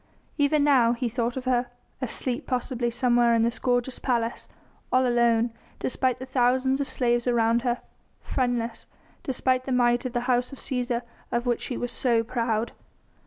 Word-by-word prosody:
Even 285 +1 +3
now 255 -5 +4
he 245 +1 -2
thought 235 +1 -2
of 260 - -5
her 250 -1 +1 0.3
asleep 250 0 -2
possibly 250 -1 -1
somewhere 240 -1 +3
in 225 - +3
this 235 +1 -1
gorgeous 245 0 0
palace 235 -2 -1 0.4
all 255 0 +4
alone, 235 -1 +3 0.3
despite 260 -1 0
the 260 - -7
thousands 260 +1 +2
of 280 - -3
slaves 240 -1 +1
around 235 -1 +3
her; 245 -1 -1 0.4
friendless, 240 -3 -2 0.3
despite 255 -1 0
the 265 - -4
might 240 -1 +3
of 255 -2 -4
the 240 - 0
House 245 0 +1
of 275 - -9
Cæsar 245 -2 -1 0.3
of 240 +1 -1
which 240 -1 0
she 250 - -4
was 245 - -3
so 235 -3 +2
proud. 230 -1 -1
245 Hz, 165 wpm, -26 LUFS, 235-255 Hz, 0.4 s, now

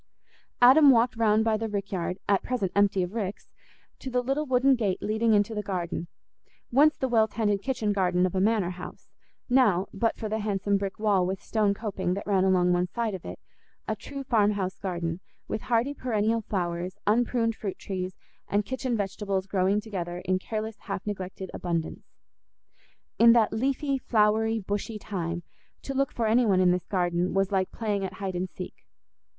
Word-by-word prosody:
Adam 280 +4 +8
walked 245 -1 +4
round 220 -1 +3
by 220 -1 +3
the 220 +1 -3
rick 200 -1 -4
yard, 180 -1 -2
at 200 -1 +3
present 225 -8 -2
empty 200 -2 +3
of 180 +2 -5
ricks, 205 -4 -4 0.5
to 265 - -6
the 250 0 0
little 275 +4 -1
wooden 260 +1 +4
gate 210 -7 0
leading 220 +1 +2
into 205 +2 +2
the 210 - -2
garden—once 200 - -1
the 265 - -1
well 225 -3 +3
tended 205 -2 0
kitchen 220 -4 -1
garden 180 -2 +2
of 185 - -2
a 190 - +1
manor 205 -3 +2
house; 180 0 -10 0.4
now, 230 -8 +3
but 225 +3 0
for 220 - -4
the 220 +1 -2
handsome 205 -1 0
brick 195 -1 -2
wall 205 -3 +2
with 190 +1 -2
stone 210 -3 0
coping 195 -4 -2
that 200 - -5
ran 195 -2 +2
along 180 -2 +3
one 180 0 +1
side 225 +3 -2
of 185 - -6
it, - - -6 0.5
a - - -1
true 275 -1 -7
farmhouse 205 -6 +1
garden, 170 -3 -3 0.3
with 215 - -3
hardy 245 +4 +1
perennial 230 -4 0
flowers, 180 -3 -3
unpruned 230 +1 +2
fruit 200 -4 -5
trees, 185 -1 -5 0.3
and 205 0 0
kitchen 255 -1 -2
vegetables 195 -1 -2
growing 195 +1 +1
together 180 -5 -5
in 185 0 +1
careless, 220 +2 -5
half 195 -2 -5
neglected 190 -2 -5
abundance. 170 -2 -4 1.0
In 230 0 +8
that 230 -3 +3
leafy, 270 +4 0
flowery, 220 -1 +2
bushy 205 +2 -3
time, 175 -4 -4 0.4
to 275 - -4
look 275 0 0
for 230 - -2
any 230 +2 +3
one 190 -3 +3
in 180 -1 +5
this 180 -1 -1
garden 175 -1 0
was 195 0 +1
like 190 -1 0
playing 205 -3 -2
at 190 - -4
"hide 195 -2 -4
and 180 +1 -2
seek." 180 - -7
205 Hz, 180 wpm, -27 LUFS, 185-230 Hz, 1.0 s, Adam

